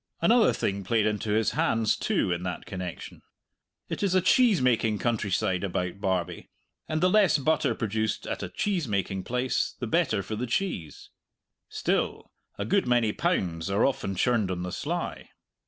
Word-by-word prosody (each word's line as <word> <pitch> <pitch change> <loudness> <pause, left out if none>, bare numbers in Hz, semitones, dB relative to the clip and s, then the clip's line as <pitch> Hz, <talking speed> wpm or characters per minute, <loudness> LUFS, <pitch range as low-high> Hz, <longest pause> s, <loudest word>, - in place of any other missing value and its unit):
Another 235 0 +5
thing 100 0 -2
played 110 +3 +1
into 105 0 -1
his 110 +1 +2
hands, 115 -8 +1
too, - - 0
in 85 0 -1
that 90 -2 -4
connection. 90 -3 -7 0.7
It - - -4
is 195 -2 +1
a - - +6
cheese 235 0 +4
making 115 -4 +2
countryside 100 -5 0
about 90 0 -3
Barbie, 95 -3 -2 0.4
and 155 0 -1
the 180 - +5
less 200 -3 +4
butter 145 -4 +1
produced 110 -1 -2
at - - -4
a - - -4
cheese 195 - -1
making 100 -2 -2
place, 125 0 -1
the - - -4
better - - +1
for 110 - -5
the 125 +4 -3
cheese. 115 - -3 0.6
Still, - - -1 0.3
a - - -3
good 195 -7 +1
many 120 -3 +3
pounds 85 -1 -1
are 100 +2 +2
often 100 -8 -1
churned 110 0 +1
on 90 -1 -3
the 90 - -4
sly. - - -4
110 Hz, 170 wpm, -27 LUFS, 95-140 Hz, 0.7 s, a